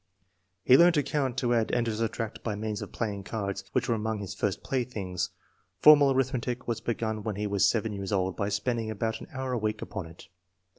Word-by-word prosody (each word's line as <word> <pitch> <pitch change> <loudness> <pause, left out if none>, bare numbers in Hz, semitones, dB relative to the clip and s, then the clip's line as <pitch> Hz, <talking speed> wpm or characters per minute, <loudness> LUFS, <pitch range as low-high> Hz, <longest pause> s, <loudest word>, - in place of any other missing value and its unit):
"He 130 - +7
learned 170 +1 +6
to 145 - +3
count, 135 -3 -1
to 120 -1 +1
add 115 -2 +2
and 120 - +1
to 115 -2 -1
subtract 115 0 -3
by 110 -3 -2
means 105 0 -3
of - - -7
playing 105 -3 -3
cards, 100 -1 -3
which 125 -1 +1
were 120 - +2
among 110 0 -1
his 100 -1 -5
first 100 0 -2
playthings. 100 -8 -2 0.5
Formal 145 +4 +7
arithmetic 125 -2 -1
was 115 -2 -2
begun 110 -2 -2
when 105 -1 -3
he 105 +1 -2
was 100 -1 +3
7 110 -1 -1
years 100 -1 -5
old 95 -2 0
by 100 +3 -1
spending 110 +2 -1
about 110 +1 -2
an - - -9
hour 130 -1 -3
a 120 - 0
week 110 0 -1
upon 95 -5 -6
it. 80 +1 -14
110 Hz, 215 wpm, -28 LUFS, 100-125 Hz, 0.5 s, He